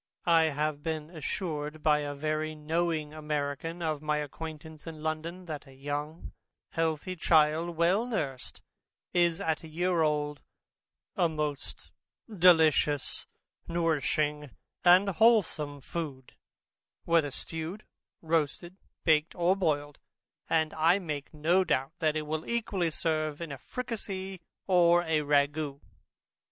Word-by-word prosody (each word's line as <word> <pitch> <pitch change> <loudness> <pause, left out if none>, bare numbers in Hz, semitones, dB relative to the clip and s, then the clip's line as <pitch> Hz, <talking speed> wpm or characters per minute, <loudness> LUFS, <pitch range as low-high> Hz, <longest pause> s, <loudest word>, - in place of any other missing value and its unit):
I 165 -2 +5
have 150 -1 -1
been 155 0 -4
assured 155 -2 -4
by 150 -1 +4
a 145 -1 -4
very 155 +1 -2
knowing 155 0 -1
American 150 +2 -3
of 155 -3 -1
my 150 0 0
acquaintance 155 +1 -7
in 155 -2 -8
London, 165 +3 -3
that 155 -3 -6
a 135 - -15
young 145 +4 -5 0.4
healthy 165 +2 -1
child 160 0 +3
well 185 +8 +3
nursed, 140 - -4 0.5
is, 170 -1 +3
at 160 -5 -1
a - - -8
year 175 +2 0
old, 150 -1 0 0.7
a 170 - +3
most 150 -2 -4 0.4
delicious 160 -5 +4 0.4
nourishing 150 -3 0 0.3
and 180 +3 +7
wholesome 180 -9 +3
food, 140 -4 -6 0.7
whether 165 -3 +3
stewed, 165 +8 -5 0.4
roasted, 165 +3 -1 0.3
baked, 155 -1 +3
or 175 +2 +3
boiled; 145 -6 -1 0.5
and 160 -1 +2
I 165 +4 +4
make 155 -7 -5
no 165 +5 +2
doubt 135 -5 0
that 155 -2 +1
it 155 - -1
will 155 +1 -4
equally 205 -7 0
serve 155 -2 -1
in 165 -3 -5
a 140 - -6
fricasee, 195 -6 -5 0.2
or 175 -2 +5
a 160 -2 +1
ragoust. 145 0 +1
155 Hz, 125 wpm, -29 LUFS, 150-170 Hz, 0.7 s, and